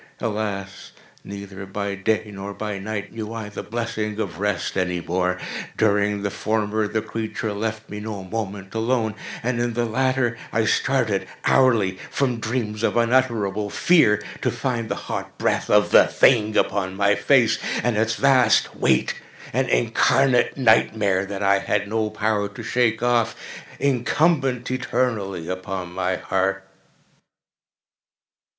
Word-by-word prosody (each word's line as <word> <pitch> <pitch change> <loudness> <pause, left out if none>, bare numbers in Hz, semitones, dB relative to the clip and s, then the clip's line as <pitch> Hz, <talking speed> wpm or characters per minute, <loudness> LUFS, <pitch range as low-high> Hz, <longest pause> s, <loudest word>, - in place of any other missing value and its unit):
Alas! 105 -2 -4 0.3
neither 100 -1 -8
by 100 +1 -3
day 105 +2 -1
nor 100 +1 -7
by 105 0 -4
night 105 +1 -5
knew 110 -1 -5
I 115 -2 -5
the 105 - -6
blessing 110 -2 -3
of 100 -5 -4
rest 100 -3 -1
any 90 -2 0
more! 90 +2 -1 0.4
During 105 -1 +2
the 100 - -1
former 110 0 -1
the 110 +1 -2
creature 110 -1 -4
left 110 +1 -4
me 105 - -7
no 105 -2 -6
moment 100 -1 -5
alone, 115 -1 0 0.3
and 120 0 -1
in 120 0 0
the 120 +1 0
latter 130 0 0
I - - +1
started - - +1 0.2
hourly 110 -8 +3
from 125 -4 0
dreams 110 -2 -3
of 115 - +1
unutterable 115 -4 +1
fear 105 - +3 0.2
to - - +1
find 120 -4 -2
the - - -1
hot - - -5
breath - - 0
of - - +4
the - - +7
thing 110 -4 +3
upon 95 -2 0
my 100 0 +3
face, 120 -1 +3 0.2
and 120 -1 +1
its 115 +1 +1
vast 130 -5 +4
weight—an 65 -1 -1
incarnate 125 - +3
nightmare 110 -5 +3
that 100 0 -4
I 100 0 +4
had 105 +1 -1
no 110 0 -1
power 105 -1 -1
to 105 - -9
shake 120 -2 +1
off—incumbent 125 +3 0
eternally 115 -9 -1
upon 90 -1 -5
my 90 0 0
heart! 95 +1 -1
110 Hz, 140 wpm, -23 LUFS, 100-115 Hz, 0.4 s, the